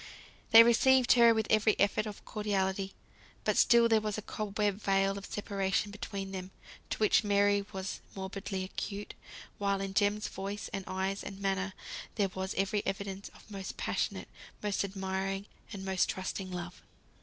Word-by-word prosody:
They 225 0 +11
received 245 +2 +5
her 235 -1 +7
with 220 -1 +1
every 215 0 +4
effort 205 +2 +2
of 210 - -8
cordiality; 195 -2 -1 0.5
but - - +1
still 235 -1 +6
there 225 -1 +4
was 210 -1 -2
a 215 - -5
cobweb 210 -1 -2
veil 195 0 +2
of 200 0 -7
separation 200 0 -1
between 195 -1 -5
them, 185 -1 -5 0.4
to - - -2
which 215 +1 +4
Mary 205 0 +3
was 190 -1 -5
morbidly 190 0 -4
acute; 200 +2 -5 0.5
while 200 -1 +1
in 195 0 -3
Jem's 205 +1 +2
voice, 200 +2 -5
and 195 - -3
eyes, 190 +1 -2
and 195 -1 -7
manner, 195 0 -1 0.4
there 200 -3 +1
was 190 +1 -4
every 195 +2 0
evidence 195 0 -4
of - - -17
most 195 -1 -6
passionate, - - -2 0.4
most 205 -1 0
admiring, 195 0 -3 0.3
and 195 -3 -6
most 190 -1 +1
trusting 190 0 -3
love. 175 -1 -6
200 Hz, 160 wpm, -31 LUFS, 190-210 Hz, 0.5 s, They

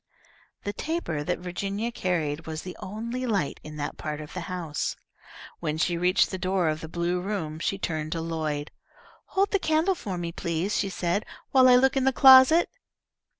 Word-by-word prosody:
The 205 - -3
taper 300 - -3
that - - -1
Virginia 195 +5 -3
carried 160 -8 -2
was 160 0 -5
the 185 - -7
only 235 +6 -4
light 200 -11 -1
in 155 0 -9
that 145 -1 -4
part 150 -1 -4
of 150 -1 -9
the 185 - -4
house. 170 -5 -3 0.6
When 150 0 -2
she 170 +2 +1
reached 180 +3 +2
the 190 - -4
door 185 -2 +1
of 155 0 -2
the 160 - -7
blue 175 +1 -1
room 180 -6 -3
she 195 - -1
turned 155 -4 -3
to 165 - -3
Lloyd. 155 -3 -3 0.6
"Hold 390 +1 +3
the 400 - +2
candle 320 +3 +2
for 200 - -5
me, 170 -1 -3
please," 170 +4 -2
she 200 - 0
said, 180 +2 -1 0.3
"while 260 -1 +6
I 250 - +8
look 265 +2 +4
in 265 -1 +1
the 265 - +4
closet." 265 +6 +8
180 Hz, 190 wpm, -26 LUFS, 160-235 Hz, 0.6 s, I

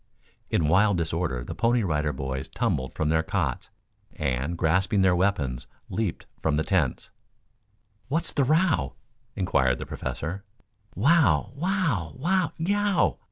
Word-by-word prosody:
In 80 - +1
wild 95 +4 +4
disorder 80 -6 -1
the - - -6
Pony 120 0 +2
Rider 75 -4 0
Boys 65 -1 -4
tumbled 65 0 -2
from 80 - 0
their 80 0 +3
cots, 80 - -2 0.4
and, 70 +6 -2
grasping 95 +5 +2
their 95 -1 +4
weapons, 75 -10 0 0.2
leaped 100 -2 -2 0.2
from 80 -2 +1
the 80 - +1
tents. 80 -9 0 1.0
"What's 165 +5 0
the 140 - +2
row?" 155 - +2 0.4
inquired 65 -9 +2
the - - -6
Professor. 90 +6 -5 0.5
"Wow! 105 - +3
Wow! 150 - -1
Wow! 175 +4 +1
Yeow!" 190 - +1
90 Hz, 130 wpm, -26 LUFS, -, 1.0 s, wild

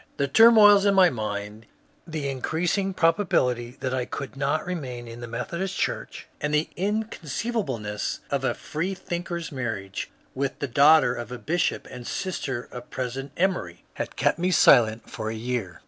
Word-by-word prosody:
The 140 - +1
turmoils 210 +2 +7
in 200 - +4
my 185 -2 +6
mind, 105 -1 -5 0.4
the 155 -3 -3
increasing 170 +8 -1
probability 165 - +1
that 130 -1 -2
I 130 -1 -1
could 140 +2 -6
not 140 +3 0
remain 130 -9 -5
in 115 +1 -9
the 120 - -6
Methodist 170 +11 -4
Church, - - -3 0.2
and 150 - -1
the 150 +1 +1
in« 210 +4 0
oonceivableness 145 - -3
of - - 0
a - - 0
freethinker's 175 0 -4
marriage 110 -8 -4 0.2
with 135 0 -2
the 140 - -3
daughter 140 +1 +5
of 120 0 -6
a 125 - -4
bishop 160 +10 -1
and 120 -1 -8
sister 135 -10 -3
of 125 0 -9
President 130 +2 -4
Emory, 170 - -1
had - - -5
kept - - +1
me 180 +2 +1
silent 115 -9 +5
for 110 -1 -5
a 110 - -4
year. 110 -5 -3
140 Hz, 160 wpm, -25 LUFS, 120-175 Hz, 0.4 s, turmoils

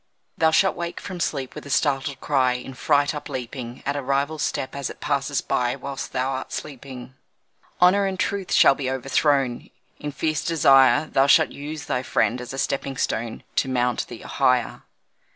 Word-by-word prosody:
Thou 160 - +3
shalt 190 +4 +3
wake 170 0 -5
from 185 -2 -7
sleep 135 -6 -2
with - - -8
a - - -9
startled 140 -1 0
cry, 130 -3 +2
In 125 +2 -6
fright 145 +3 +2
upleaping 125 -3 -6
At 140 - -1
a 145 - -2
rival's 140 +3 -1
step 130 0 -2
as 140 -2 -3
it - - -10
passes 140 -1 -1
by 125 0 0
Whilst 140 0 -6
thou 130 +1 -1
art 130 0 -5
sleeping. 130 -3 -7 0.7
Honour 195 +3 +5
and 190 -1 -4
truth 200 -2 -2
shall - - +6
be 135 -1 -3
overthrown 135 -1 0 0.3
In 150 - -4
fierce 155 +2 -1
desire; 135 -4 +5
Thou 135 -2 +2
shalt - - +5
use 150 +1 -7
thy 125 - -1
friend 125 -1 0
as 125 - -7
a 135 - -6
stepping 135 0 -2
stone 115 -1 -2
To 135 - +2
mount 125 -1 0
thee - - -9
higher. - - +1
135 Hz, 180 wpm, -23 LUFS, 130-150 Hz, 0.7 s, shall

